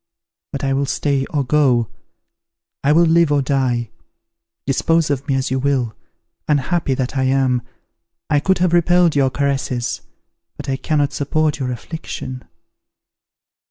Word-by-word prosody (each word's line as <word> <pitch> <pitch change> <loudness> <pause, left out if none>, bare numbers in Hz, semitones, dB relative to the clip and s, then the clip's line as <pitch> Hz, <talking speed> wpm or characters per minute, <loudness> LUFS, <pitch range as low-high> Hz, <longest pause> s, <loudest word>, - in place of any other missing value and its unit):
But 140 - -5
I 135 0 +1
will 140 +1 0
stay 140 -2 0
or 145 -2 -1
go, 125 -4 +2 1.0
I 140 - +3
will 170 +3 +5
live 165 -1 +4
or 145 -1 +2
die, 130 -4 0 0.7
dispose 160 +3 +1
of 140 +1 -2
me 135 - +1
as 130 -1 -1
you 130 - +1
will. 130 -5 0 0.5
Unhappy 150 0 +1
that 130 +1 -3
I 130 -1 +1
am! 130 -2 +2 0.7
I 150 - +2
could 190 +6 +2
have 175 -1 +1
repelled 175 -1 +4
your 135 -2 +3
caresses; 135 -3 -1 0.6
but 145 - -8
I 135 -1 -1
cannot 145 -1 0
support 150 +1 0
your 130 -2 -2
affliction." 130 -1 -6
140 Hz, 145 wpm, -19 LUFS, 130-150 Hz, 1.0 s, will